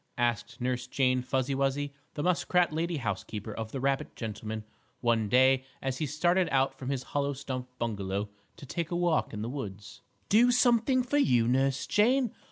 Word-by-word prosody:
asked 120 -1 -1
Nurse 125 0 -2
Jane 130 -1 +2
Fuzzy 130 +1 -1
Wuzzy, 140 +1 0 0.2
the 145 - -2
muskrat 180 -1 +2
lady 165 +1 -1
housekeeper, 105 -2 -4
of 110 0 -5
the 135 - -4
rabbit 135 +1 -1
gentleman 110 -1 -5 0.4
one 115 -3 +1
day 130 +2 +5 0.2
as 135 -1 -3
he 155 - -1
started 175 +5 +2
out 135 -1 +2
from 135 -1 -7
his 135 -2 -2
hollow 140 +1 -1
stump 130 -2 -5
bungalow 100 -3 -2 0.3
to - - -10
take 165 +4 -3
a 175 - -2
walk 175 -2 +1
in 105 -1 -5
the - - -3
woods. 105 -3 -7 0.3
"Do 240 +4 +5
something 245 +1 +3
for 265 +4 0
you, 120 - +3
Nurse 135 +2 +1
Jane? 245 +3 +2
135 Hz, 175 wpm, -29 LUFS, 120-160 Hz, 0.4 s, day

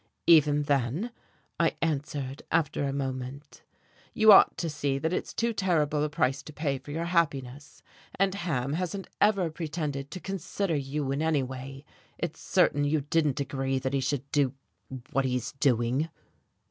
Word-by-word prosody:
"Even 150 -3 +5
then," 145 - 0 0.5
I - - +2
answered 145 -3 -2
after 155 -3 +1
a 140 - -1
moment, 135 +1 -5 0.5
"you 220 0 +7
ought 195 - +7
to 165 - -2
see 140 -3 -1
that 160 +5 -1
it's - - -2
too 235 0 0
terrible 155 -7 +1
a 150 - 0
price 135 -3 0
to - - -11
pay 145 -3 -2
for 135 - -14
your 165 +3 -2
happiness. 145 -5 -1 0.3
And 195 0 +2
Ham 150 -9 -2
hasn't 185 +3 -3 0.2
ever 195 -5 +3
pretended 150 -4 -4
to 185 - -7
consider 190 -1 -2
you 140 0 -2
in 140 +2 -1
any 160 -4 +2
way. 135 +2 -8 0.3
It's - - -4
certain 145 - +2
you 145 +1 +1
didn't 150 -1 +1
agree 135 -1 -1
that 130 +1 -2
he 140 - +2
should 135 0 -1
do 140 -3 +2 0.6
what 135 - +2
he 125 -1 0
is 120 -1 -3
doing." 130 +4 +2
145 Hz, 165 wpm, -28 LUFS, 135-165 Hz, 0.6 s, you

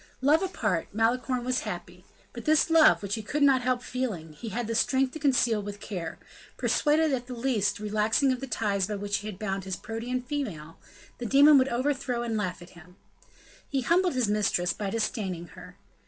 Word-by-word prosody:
Love 295 +6 +4
apart, 220 - -1
Malicorne 245 +3 +1
was 255 0 +1
happy; - - -7 0.3
but - - -8
this 310 +1 +3
love, 320 -8 +6
which 200 0 -3
he 220 - -2
could 290 +8 -1
not 270 -2 +5
help 250 0 0
feeling, 210 -13 -4
he 225 +9 -7
had 235 +3 -3
the 230 - -3
strength 260 +3 +1
to 315 - -6
conceal 245 -6 +2
with 205 0 -7
care; 180 -6 -6 0.4
persuaded 310 +1 +2
that - - +3
at 245 0 -10
the 250 - -6
least 230 -5 0
relaxing 215 +5 +1
of 255 - -2
the 270 - -6
ties 200 -5 0
by 210 - -3
which 205 0 -2
he 210 - -7
had 210 -4 -6
bound 195 -2 -3
his 190 -1 -4
Protean 235 +5 -4
female, 205 - -5 0.4
the 245 - -4
demon 285 +4 +7
would 260 +1 +2
overthrow 255 -1 -1
and 230 -2 -2
laugh 185 -4 -3
at 175 - -15
him. 175 +1 -16 0.7
He 275 -1 0
humbled 350 +4 +2
his 250 -4 +1
mistress 195 -4 +1
by 200 +2 -4
disdaining 195 -6 -3
her. - - -13
230 Hz, 200 wpm, -27 LUFS, 205-265 Hz, 0.7 s, demon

